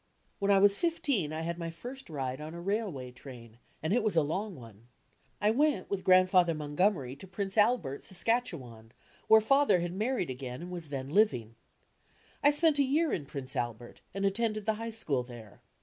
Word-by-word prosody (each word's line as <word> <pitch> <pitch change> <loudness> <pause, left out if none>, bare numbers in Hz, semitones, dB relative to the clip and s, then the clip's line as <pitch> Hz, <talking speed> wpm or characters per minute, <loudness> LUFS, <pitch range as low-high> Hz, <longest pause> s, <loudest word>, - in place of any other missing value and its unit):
When 200 -1 0
I 200 - +6
was 200 +1 +5
fifteen 280 - 0
I 155 +1 -4
had 170 +1 -3
my 165 -1 -3
first 245 +10 -9
ride 135 -2 -4
on 155 +2 -7
a - - -7
railway 180 - -3
train, 120 -3 -12 0.2
and 160 - 0
it 245 - +3
was 215 -4 0
a 160 - +4
long 190 +7 -3
one. 115 -2 -14 0.5
I 210 - +3
went 285 -4 +1
with 195 -2 -2
Grandfather 185 -2 +5
Montgom 155 +7 +1
ery 130 -4 -7
to 190 - -11
Prince 195 +1 -3
Atben, 210 - +2
Saskatchewan, 165 - -2 0.3
where 220 0 +7
Father 275 -3 +4
had 175 0 -3
mar 220 +7 -1
ried 175 - -2
again 130 +2 -6
and 180 - -8
was 170 -4 -7
then 135 -1 -5
living. 145 - +2 0.9
I 290 - +7
spent 295 0 +4
a - - +6
year 300 +4 +1
in 145 -4 -3
Prince 135 -2 -6
Albert 120 0 -4
and 195 +1 -2
attended 215 +1 0
the 220 - +2
High 230 - -3
School 160 - -1
there. 120 -4 -12
180 Hz, 195 wpm, -30 LUFS, 135-220 Hz, 0.9 s, where